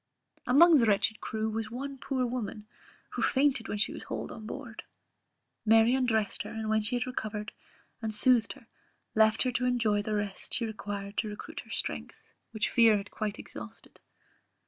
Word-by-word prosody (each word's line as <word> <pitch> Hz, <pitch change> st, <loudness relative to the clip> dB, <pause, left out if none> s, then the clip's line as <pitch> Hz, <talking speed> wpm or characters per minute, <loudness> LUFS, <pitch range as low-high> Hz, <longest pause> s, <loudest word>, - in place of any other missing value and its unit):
Amongst 310 Hz, +5 st, +7 dB
the 230 Hz, -, +3 dB
wretched 210 Hz, +1 st, +2 dB
crew 220 Hz, 0 st, -2 dB
was 220 Hz, 0 st, -3 dB
one 270 Hz, +3 st, -6 dB
poor 260 Hz, -2 st, -1 dB
woman, 225 Hz, -4 st, -4 dB, 0.5 s
who -, -, -4 dB
fainted 270 Hz, -4 st, +2 dB
when 210 Hz, -, -3 dB
she 205 Hz, -, +1 dB
was -, -, -8 dB
hauled -, -, -5 dB
on 220 Hz, -2 st, -8 dB
board: 240 Hz, -2 st, -7 dB, 0.8 s
Mary 225 Hz, +2 st, +5 dB
undressed 225 Hz, -5 st, +1 dB
her, -, -, -6 dB
and 220 Hz, -1 st, -4 dB
when 220 Hz, 0 st, +3 dB
she 210 Hz, +3 st, +2 dB
had 245 Hz, +1 st, 0 dB
recovered, 215 Hz, -4 st, -4 dB, 0.5 s
and 220 Hz, -1 st, -2 dB
soothed 235 Hz, +1 st, +4 dB
her, 275 Hz, -4 st, -18 dB, 0.5 s
left 220 Hz, 0 st, +4 dB
her 255 Hz, -, 0 dB
to 250 Hz, +1 st, -1 dB
enjoy 230 Hz, -4 st, +2 dB
the 215 Hz, +1 st, -2 dB
rest 205 Hz, -2 st, -3 dB
she 235 Hz, -, 0 dB
required 205 Hz, -2 st, -6 dB
to 220 Hz, -, 0 dB
recruit 210 Hz, -, -8 dB
her -, -, -11 dB
strength, -, -, -4 dB, 0.3 s
which 220 Hz, -1 st, -1 dB
fear 225 Hz, -3 st, +6 dB
had 200 Hz, 0 st, -7 dB
quite 215 Hz, -2 st, -3 dB
exhausted. 110 Hz, -1 st, -11 dB
220 Hz, 180 wpm, -30 LUFS, 210-250 Hz, 0.8 s, Amongst